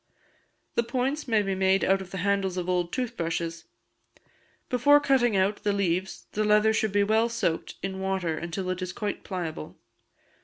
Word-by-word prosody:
The - - +2
points 260 +5 -2
may 220 -3 +3
be 195 -1 -1
made 190 0 +2
out 195 0 +3
of 190 - -9
the 190 - -6
handles 195 -2 +1
of 180 -1 -2
old 180 -1 0
tooth 250 -2 -3
brushes. 165 -1 -3 1.0
Before 285 +4 +5
cutting 260 -7 +2
out 195 +2 +2
the 205 - +1
leaves 190 -1 -1
the 215 - 0
leather 210 +1 +4
should 220 -1 0
be 205 0 +3
well 220 +3 +2
soaked 215 -8 -2
in 190 0 -3
water, 190 -4 -1
until 175 +3 -3
it 185 0 -4
is 185 0 -4
quite 205 0 -4
pliable. 170 - -5
195 Hz, 180 wpm, -27 LUFS, 185-220 Hz, 1.0 s, Before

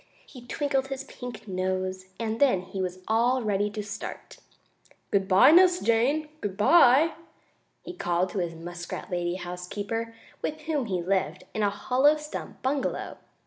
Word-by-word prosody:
He 255 - -13
twinkled 270 0 -1
his 270 0 -5
pink 245 -5 -9
nose, 185 0 -2
and 225 -1 -2
then 255 -10 +4
he 190 +1 -5
was 185 0 -4
all 240 +3 +2
ready 205 -1 +1
to 210 0 -5
start. 205 0 -7 0.7
"Good 195 -1 +2
bye, 195 +9 +7
Nurse 360 +1 +6
Jane! 255 +7 +2
Good 195 -2 -4
bye!" 295 +5 +6 0.7
he 355 - -7
called 175 - 0
to 200 - -2
his 170 -2 -2
muskrat 175 +2 -7
lady 175 0 -1
housekeeper, 200 +6 -5 0.3
with 310 0 -3
whom 300 -5 -1
he 185 -4 -1
lived 185 -2 -1
in 215 - -2
a 205 - +3
hollow 260 +8 +3
stump 300 0 -8
bungalow. 270 +2 -2
210 Hz, 155 wpm, -27 LUFS, 185-270 Hz, 0.7 s, bye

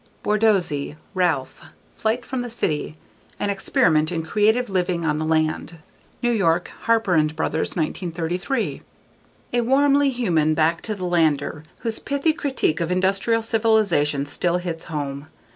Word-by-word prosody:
Borsodi, 195 -10 +1 0.2
Ralph. 170 -8 0 0.3
Flight 225 +3 -1
from 260 -2 -3
the 245 - -5
City: 155 -8 -2 0.4
An 205 - 0
Experiment 160 -5 +2
in 165 -2 -2
Creative 215 +8 +2
Living 180 -3 -1
on 150 -1 0
the 155 - -1
Land. 160 +1 0 0.5
New 240 - +3
York: 175 -6 +1
Harper 225 -4 +2
and 155 -1 +2
Brothers, 160 0 -1
1933. 175 - -2 0.7
A 240 - +3
warmly 280 +3 +3
human 170 - +1
back 165 +1 +2
to 215 - -3
the 185 -2 -5
lander 160 -3 +1 0.2
whose 225 -2 -2
pithy 280 +3 0
critique 265 - -1
of 170 +1 -1
industrial 195 +5 +1
civilization 210 -11 +2
still 170 +4 0
hits 175 -2 -5
home. 145 -2 -4
180 Hz, 140 wpm, -22 LUFS, 160-225 Hz, 0.7 s, New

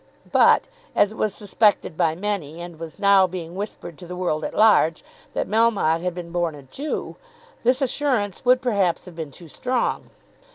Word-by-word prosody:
But, - - +5 0.3
as 205 - +4
it - - -10
was 210 -2 0
suspected 205 -4 +1
by 160 -2 +1
many, 175 -5 -3
and 170 -2 -9
was 165 -1 -8
now 200 -2 +5
being 170 -2 -7
whispered 190 -4 -7
to 175 - -10
the 180 - -6
world 175 -4 -1
at - - -4
large, 210 -7 +4 0.3
that - - -1
Melmotte 210 -7 +2
had 180 -1 -2
been 175 -2 -7
born 170 -3 -1
a 145 - -12
Jew, 280 - -5 0.5
this 250 +3 +2
assurance 250 -8 0
would 250 +1 +4
perhaps 200 -8 +1
have 180 -3 -12
been 160 -3 -5
too 165 +5 -12
strong. 250 - -2
185 Hz, 180 wpm, -23 LUFS, 165-215 Hz, 0.5 s, But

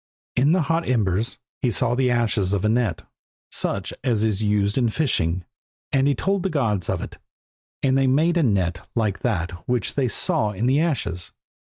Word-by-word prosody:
In 135 +5 +3
the 180 -2 +2
hot 165 +3 0
embers 110 -3 0 0.2
he 125 - +2
saw 120 +2 +1
the 130 0 +2
ashes 115 -5 +1
of 100 0 0
a - - +3
net, 110 -7 0 0.5
such 100 -1 -1
as 115 -5 +1
is 110 -2 0
used 105 -1 +1
in 120 -3 +2
fishing, 90 - 0 0.5
and 135 0 +3
he 140 - +2
told 195 0 0
the 190 - -1
gods 110 - 0
of - - -1
it, - - -9 0.6
and 135 -1 +3
they 135 0 +3
made 155 +6 +3
a 170 - +3
net 95 - +1 0.2
like 105 -5 0
that 95 -8 -1 0.2
which 125 -4 +1
they 135 -3 +1
saw 105 -1 +1
in 105 +4 -2
the 135 +3 +3
ashes. 90 - -2
115 Hz, 190 wpm, -23 LUFS, 100-135 Hz, 0.6 s, In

